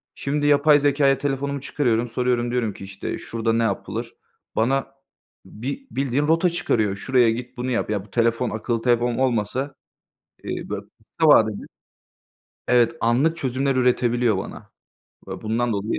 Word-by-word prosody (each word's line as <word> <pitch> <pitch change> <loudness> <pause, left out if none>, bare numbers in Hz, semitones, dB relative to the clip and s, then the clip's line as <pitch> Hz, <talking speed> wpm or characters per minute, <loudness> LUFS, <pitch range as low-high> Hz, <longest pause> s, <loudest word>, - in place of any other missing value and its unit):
Şimdi, 145 +1 -2
yapay 145 0 +5
zekâya, 140 -1 +3
telefonumu 140 0 -2
çıkarıyorum, 120 -5 0
soruyorum, 120 -1 0
diyorum 115 -5 -1
ki - - -11
işte, 95 0 -5
"Şurada 115 0 -2
ne 115 0 +2
yapılır?" - - -3 0.4
Bana 130 +4 +1 0.6
bi 140 - -6
bildiğin 140 +2 0
rota 165 +3 +3
çıkarıyor. 110 - 0
"Şuraya 125 +2 +3
git, 125 +2 -6
bunu 125 +1 -2
yap." 115 - -1
Ya 100 -2 -2
bu 100 - -22
telefon, 115 +1 +1
akıllı 115 +1 -2
telefon 120 -1 +2
olmasa, 130 +2 -1 0.7
eee, - - -5
böyle - - -4 0.3
kısa 160 -2 +5
vadede 110 -6 +5 1.1
Evet, 125 +5 +4
anlık 135 +8 +2
çözümler 135 -1 -1
üretebiliyor 120 -3 +2
bana - - -8 0.6
ve - - -7
bundan 115 +2 0
dolayı 100 +2 -2
125 Hz, 145 wpm, -23 LUFS, 115-140 Hz, 1.1 s, yapay